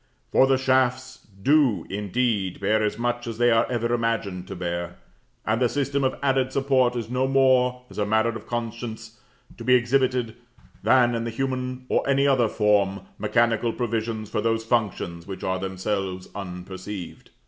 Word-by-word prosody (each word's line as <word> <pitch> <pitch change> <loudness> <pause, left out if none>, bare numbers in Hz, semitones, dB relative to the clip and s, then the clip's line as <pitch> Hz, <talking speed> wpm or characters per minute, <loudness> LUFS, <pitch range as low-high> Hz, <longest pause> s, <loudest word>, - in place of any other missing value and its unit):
For 135 - +5
the 135 0 +3
shafts 130 -1 0 0.2
do, 140 -6 +3
indeed, 105 -1 -1
bear 110 +3 +2
as 105 -1 -1
much 120 +1 -2
as 115 -1 -5
they 120 0 +4
are 115 0 +3
ever 120 -1 -1
imagined 115 -6 -1
to 95 - -6
bear, 85 -1 -4 0.5
and 110 +3 0
the 125 - +3
system 140 0 -1
of 130 - 0
added 130 -1 +2
support 130 -2 +2
is 115 -3 -3
no 125 +2 0
more, 130 -2 +3
as - - -9
a 105 - +1
matter 110 +2 +2
of 110 -2 -7
conscience, 115 -1 -5 0.4
to - - -6
be 125 +2 +5
exhibited, 125 -1 +1 0.5
than, 120 -2 +4
in 115 -1 -1
the 115 - -3
human 130 +1 -3
or - - +1
any 140 0 +3
other 130 -4 +3
form, 100 -2 +2 0.2
mechanical 115 -1 +2
provisions 115 -2 -2
for 105 - -2
those 115 0 0
functions 100 -7 -1
which 95 -1 -7
are 95 0 -1
themselves 95 0 -3
unperceived. 95 0 -7
115 Hz, 170 wpm, -24 LUFS, 105-125 Hz, 0.5 s, For